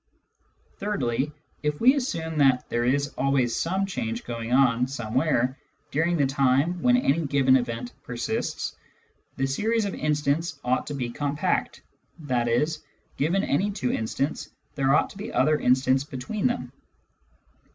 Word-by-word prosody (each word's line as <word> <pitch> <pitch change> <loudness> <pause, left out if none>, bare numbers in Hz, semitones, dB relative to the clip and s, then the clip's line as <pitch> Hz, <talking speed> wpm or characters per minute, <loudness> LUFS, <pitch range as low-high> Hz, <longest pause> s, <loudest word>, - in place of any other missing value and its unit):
Thirdly, 150 - -1 0.3
if 150 -1 -1
we 255 +3 +6
assume 165 - -2
that 135 -3 +4
there 120 0 0
is 140 +3 +1
always 135 -4 +2
some 190 +4 0
change 115 -11 -3
going 115 -1 -5
on 125 -2 +4
somewhere 130 +1 0 0.3
during 165 +4 +1
the 145 - +3
time 135 +5 +2
when 250 0 +4
any 165 - +2
given 135 -2 +4
event 120 -1 -2
persists, 120 -1 -3 0.6
the 135 - +1
series 215 +11 0
of 200 - -3
instants 150 +1 -1
ought 125 +1 0
to 145 - -4
be 125 -3 -3
compact, 145 +3 -1 0.4
i.e. 120 +1 +2 0.5
given 170 +7 +1
any 190 +9 +1
two 130 -11 -2
instants, 135 +6 -2 0.2
there 135 0 +2
ought - - +2
to 195 - -13
be 215 +3 -5
other 155 0 +3
instants 130 +1 +3
between 145 - -2
them. 245 0 -3
140 Hz, 140 wpm, -26 LUFS, 125-165 Hz, 0.6 s, we